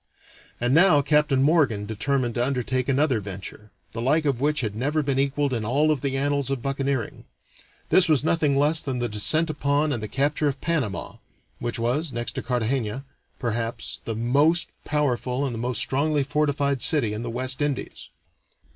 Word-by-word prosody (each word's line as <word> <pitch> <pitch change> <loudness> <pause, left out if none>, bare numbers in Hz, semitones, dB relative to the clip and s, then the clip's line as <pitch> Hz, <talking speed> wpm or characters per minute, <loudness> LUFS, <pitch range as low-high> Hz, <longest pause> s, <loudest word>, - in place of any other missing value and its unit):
And 120 +2 +1
now 160 -3 +6
Captain 145 -2 +2
Morgan 140 -10 +2
determined 120 +3 -1
to 120 - 0
undertake 130 0 -1
another 135 -3 +2
venture, 100 +1 -8 0.2
the 115 - -5
like 150 +6 +2
of 135 -4 0
which 150 +1 +1
had 105 -4 -3
never 145 +6 0
been 135 -1 0
equaled 140 0 0
in 115 -3 -1
all 145 +8 +2
of 145 -4 -1
the 135 -1 -1
annals 140 0 0
of 135 -3 -3
buccaneering. 135 -3 -2 0.6
This 180 -3 +5
was 150 -3 +3
nothing 155 -3 +2
less 150 +3 +3
than 135 -4 -3
the 120 0 -1
descent 155 +10 +1
upon 145 0 0
and 120 - -3
the 105 - -4
capture 145 +5 0
of 140 -1 -2
Panama, 150 -11 -2 0.4
which 120 0 -3
was, 130 +7 -1
next 120 -1 -3
to - - -5
Cartagena, 125 0 -2 0.3
perhaps, 115 -1 -3
the 115 - -3
most 145 +9 +2 0.2
powerful 135 -2 0
and 130 - -3
the 115 - -5
most 125 +1 -2
strongly 145 +2 +1
fortified 145 -2 0
city 120 -9 +2
in 105 - -4
the 120 - -4
West 130 +3 -2
Indies. 145 -2 -3
135 Hz, 180 wpm, -24 LUFS, 120-145 Hz, 0.6 s, now